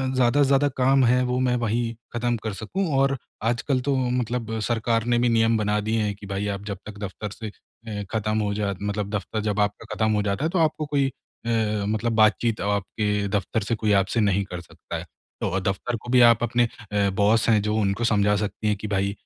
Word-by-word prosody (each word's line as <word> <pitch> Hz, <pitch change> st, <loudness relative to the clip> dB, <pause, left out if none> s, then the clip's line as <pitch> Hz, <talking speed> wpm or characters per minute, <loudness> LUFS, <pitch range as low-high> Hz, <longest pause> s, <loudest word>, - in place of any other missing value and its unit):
ज़्यादा 130 Hz, +3 st, +3 dB
से -, -, +2 dB
ज़्यादा 140 Hz, +1 st, +4 dB
काम 135 Hz, +1 st, +4 dB
है, 125 Hz, +2 st, +4 dB
वो 125 Hz, 0 st, 0 dB
मैं 125 Hz, -1 st, +2 dB
वहीं 115 Hz, 0 st, -1 dB, 0.2 s
ख़त्म 120 Hz, 0 st, 0 dB
कर 110 Hz, -2 st, -2 dB
सकूँ 175 Hz, -, -3 dB
और 135 Hz, 0 st, +2 dB, 0.3 s
आजकल 120 Hz, +4 st, +1 dB
तो 140 Hz, -, +2 dB, 0.2 s
मतलब 115 Hz, -2 st, -3 dB
सरकार 115 Hz, -1 st, 0 dB
ने 120 Hz, 0 st, +2 dB
भी 120 Hz, 0 st, +3 dB
नियम 115 Hz, 0 st, +3 dB
बना 105 Hz, 0 st, +1 dB
दिए 110 Hz, 0 st, +1 dB
हैं 105 Hz, -1 st, 0 dB
कि 100 Hz, -, -12 dB
भाई 100 Hz, +1 st, -2 dB
आप 100 Hz, -, -9 dB
जब 100 Hz, -2 st, -4 dB
तक 105 Hz, -1 st, -9 dB
दफ़्तर 100 Hz, +2 st, -5 dB
से 110 Hz, -, -5 dB
अ, 105 Hz, 0 st, -9 dB
ख़त्म 110 Hz, -1 st, 0 dB
हो 105 Hz, -1 st, 0 dB
जा 100 Hz, -1 st, -1 dB
मतलब 105 Hz, 0 st, -2 dB
दफ़्तर 105 Hz, +2 st, -3 dB
जब 105 Hz, 0 st, 0 dB
आपका 105 Hz, +2 st, 0 dB
ख़त्म 110 Hz, +1 st, +1 dB
हो 105 Hz, -, +2 dB
जाता 100 Hz, +10 st, -1 dB
है -, -, +1 dB
तो 185 Hz, -, +1 dB
आपको 155 Hz, -1 st, +1 dB
कोई 145 Hz, -2 st, +1 dB
अ, 110 Hz, -5 st, -3 dB
मतलब 110 Hz, +2 st, 0 dB
बातचीत 110 Hz, +1 st, +3 dB
आपके 105 Hz, 0 st, -1 dB
दफ़्तर 100 Hz, +2 st, -1 dB
से 115 Hz, -, +2 dB
कोई 110 Hz, -1 st, 0 dB
आपसे 100 Hz, +5 st, -2 dB
नहीं 100 Hz, -2 st, +2 dB
कर 90 Hz, -1 st, -5 dB
सकता 80 Hz, -, -9 dB
है। -, -, -7 dB, 0.4 s
तो 95 Hz, -, 0 dB
दफ़्तर 95 Hz, +6 st, -2 dB
को 120 Hz, -, -9 dB
भी 125 Hz, -1 st, +6 dB
आप 115 Hz, 0 st, +3 dB
अपने 120 Hz, +1 st, +2 dB, 0.3 s
अ, 100 Hz, -1 st, +2 dB
बॉस 105 Hz, +4 st, +2 dB
हैं 110 Hz, -2 st, +4 dB
जो 105 Hz, +1 st, -1 dB
उनको 105 Hz, +1 st, 0 dB
समझा 105 Hz, 0 st, +3 dB
सकती 105 Hz, +1 st, -4 dB
हैं 105 Hz, -, +2 dB
कि 105 Hz, -, -6 dB
भाई 100 Hz, -1 st, 0 dB
110 Hz, 225 wpm, -24 LUFS, 105-120 Hz, 0.4 s, भी